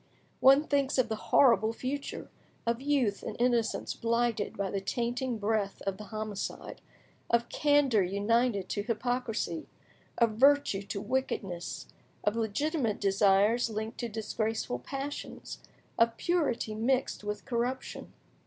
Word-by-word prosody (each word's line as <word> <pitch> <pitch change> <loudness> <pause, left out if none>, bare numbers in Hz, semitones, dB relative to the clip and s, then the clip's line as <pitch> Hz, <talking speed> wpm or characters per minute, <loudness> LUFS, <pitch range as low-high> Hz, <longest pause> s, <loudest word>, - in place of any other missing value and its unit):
One 275 +3 +7
thinks 280 -2 +1
of 250 -3 +2
the 220 - -1
horrible 225 -4 +5
future; 275 +4 -5 0.3
of 235 +1 0
youth 270 -8 +1
and - - -6
innocence 240 -2 +1
blighted 230 -2 0
by 195 -1 -1
the 195 - -2
tainting 240 +4 -2
breath 210 -1 -1
of 195 -1 -2
the 210 - -7
homicide; 215 -1 -5 0.5
of 235 0 +2
candour 290 -7 +3
united 200 +2 +1
to 205 - -1
hypocrisy; 230 -5 -2 0.5
of 230 -2 +4
virtue 270 -3 +4
to 200 0 -5
wickedness; 200 -6 -3 0.4
of 210 - +1
legitimate 230 +2 0
desires 200 +4 +3
linked 220 +1 -4
to 235 - -2
disgraceful 220 - -2
passions; 275 - -6 0.4
of 230 0 +3
purity 300 -11 0
mixed 250 +2 0
with 210 0 -4
corruption. 245 +2 -3
230 Hz, 125 wpm, -30 LUFS, 210-255 Hz, 0.5 s, One